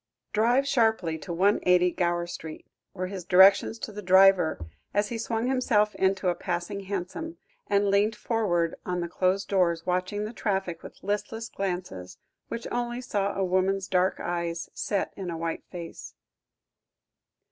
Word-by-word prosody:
"Drive 240 +6 +3
sharply 220 - +1
to 175 - -7
180, 180 -1 +3
Gower 175 -1 0
Street," 160 -2 -8 0.3
were 185 -1 -2
his 185 -1 -6
directions 190 +5 +6
to 220 - -6
the 210 0 -7
driver 190 - +5 0.4
as 205 0 +2
he 235 - -3
swung 225 0 -1
himself 235 -5 +2
into 190 0 +1
a - - +2
passing 175 +3 -3
hansom, 200 - -5 0.3
and 200 0 +2
leant 205 +2 +2
forward 180 -8 0
on 180 -1 -2
the 170 - -2
closed 185 +3 0
doors, 170 -4 +1
watching 185 +3 -1
the 215 - -6
traffic 190 -7 -2
with - - -13
listless 220 +3 -3
glances, 175 - -4 0.3
which 230 0 -5
only 240 0 -2
saw 200 -5 -1
a 195 - 0
woman's 185 +1 +1
dark 185 0 +1
eyes, 170 -1 -3
set 200 -2 -2
in 190 -3 -5
a 165 - -4
white 165 0 -4
face. 170 -2 -8
190 Hz, 155 wpm, -27 LUFS, 175-210 Hz, 0.4 s, directions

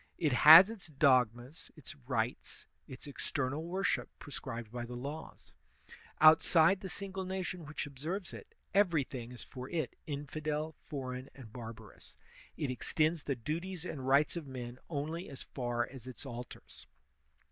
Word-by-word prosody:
It 155 -6 +1
has 160 - +10
its 220 -6 -9
dogmas, 130 -2 +2
its 155 - -10
rites, 125 -4 -3 0.2
its 130 +1 -10
external 140 +1 -3
worship 170 -7 -1
prescribed 120 -6 -7
by 120 0 -4
the 120 +1 -7
laws; 145 +6 -7 0.7
out 155 0 +8
side 170 +3 +5
the 190 - -5
single 195 -1 -5
nation 185 -3 -4
which 150 0 -4
observes 160 +7 -5
it, - - -11 0.2
everjrthing 145 - +1
is 125 - -9
for 130 -1 -8
it 160 -6 -2
infidel, 150 +2 -3
foreign, 130 -2 -6
and 120 -5 -12
barbarous; 115 -3 -10 0.4
it 140 -4 -1
extends 155 +5 0
the 140 -1 -2
duties 165 +8 -4
and 130 -7 -5
rights 140 +4 +4
of 165 -4 -5
men 125 -1 -7
only 160 +3 -3
as 135 - -8
far 120 -2 -2
as 130 -2 -11
its 130 +2 -8
altars. 120 -2 -9
145 Hz, 145 wpm, -33 LUFS, 125-160 Hz, 0.7 s, has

